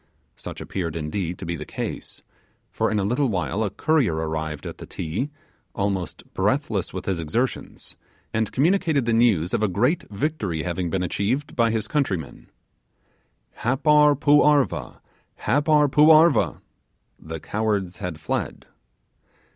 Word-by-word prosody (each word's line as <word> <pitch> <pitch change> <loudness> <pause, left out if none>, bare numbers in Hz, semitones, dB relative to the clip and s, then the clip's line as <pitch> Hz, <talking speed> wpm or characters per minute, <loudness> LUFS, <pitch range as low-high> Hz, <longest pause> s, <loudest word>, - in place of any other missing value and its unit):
Such - - -8
appeared, 85 -4 -4
indeed, 85 +3 -3
to - - -7
be 85 0 -2
the - - -6
case, - - -6 0.5
for - - 0
in 110 - 0
a 100 - +1
little 125 +8 +1
while 95 +1 -1
a 105 - 0
courier 130 - +1
arrived 80 -1 -3
at - - -7
the - - -9
'Ti', 100 - -3 0.5
almost 100 -4 -2
breathless - - 0
with - - -6
his 95 -3 -1
exertions, 115 +12 -3 0.4
and 110 -1 0
communicated 160 -2 +2
the 115 - +1
news 110 -8 +3
of - - +1
a 110 - +3
great 125 - +1
victory 105 - -2
having 90 0 -2
been 90 +2 -1
achieved 115 - -1
by 115 -2 +3
his 110 -1 -1
countrymen: 95 - -2 1.1
'Happar 150 +4 +4
poo 145 +1 +5
arva! 145 - +1 0.4
Happar 150 +1 +3
poo 150 +3 +5
arva!' 160 +2 +5 0.6
(the 80 0 -7
cowards 105 -2 -2
had 85 -3 -5
fled). 80 - -3
105 Hz, 145 wpm, -24 LUFS, 85-145 Hz, 1.1 s, poo